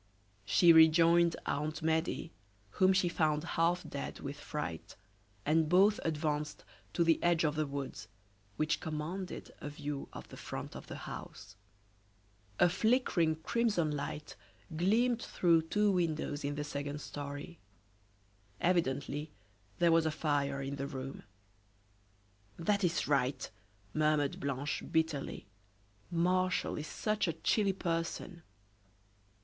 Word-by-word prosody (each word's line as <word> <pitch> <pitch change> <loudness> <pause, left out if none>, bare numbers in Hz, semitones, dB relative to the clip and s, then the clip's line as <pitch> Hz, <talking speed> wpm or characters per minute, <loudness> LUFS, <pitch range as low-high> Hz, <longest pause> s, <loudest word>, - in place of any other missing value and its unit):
She 170 - +6
rejoined 165 +1 +6
Aunt 150 +2 -2
Medea, 160 +1 0 0.5
whom 185 0 +6
she 185 -1 +3
found 155 -3 +1
half 175 +1 0
dead 140 - -5
with 140 +1 -5
fright, 145 - -5 0.5
and 155 +1 +3
both 195 +4 +5
advanced 150 -1 -2 0.3
to 170 - +3
the 165 -1 +3
edge 175 -1 +3
of 150 -2 +2
the 155 0 -1
woods, 140 -1 -5 0.5
which 155 +1 +1
commanded 160 +5 -5
a 150 - -5
view 145 -1 -5
of - - -9
the - - -10
front - - -6
of - - -9
the - - -7
house. 105 -2 -8 1.0
A 175 - +7
flickering, 180 -5 +2
crimson 210 -10 +1
light 145 +1 -5 0.4
gleamed 230 +8 +2
through 170 -2 +3
two 210 +6 +2
windows 155 -5 -1
in 145 +1 -2
the 150 - -2
second 145 0 -4
story. 145 +3 -7 1.0
Evidently 150 -3 0 0.5
there 170 -1 +4
was 165 -1 +4
a - - +3
fire 145 -3 0
in 140 +1 -4
the 140 0 -3
room. 135 -1 -6 1.4
"That 200 +4 +1
is 170 -3 +1
right," 135 -2 +1 0.5
murmured 150 -2 +1
Blanche, 140 +1 -2
bitterly; 160 -7 -1 0.6
"Martial 185 +2 +1
is 150 - -5
such 215 -2 -1
a 165 - 0
chilly 200 +2 +1
person!" 170 0 -3
160 Hz, 125 wpm, -33 LUFS, 145-175 Hz, 1.4 s, A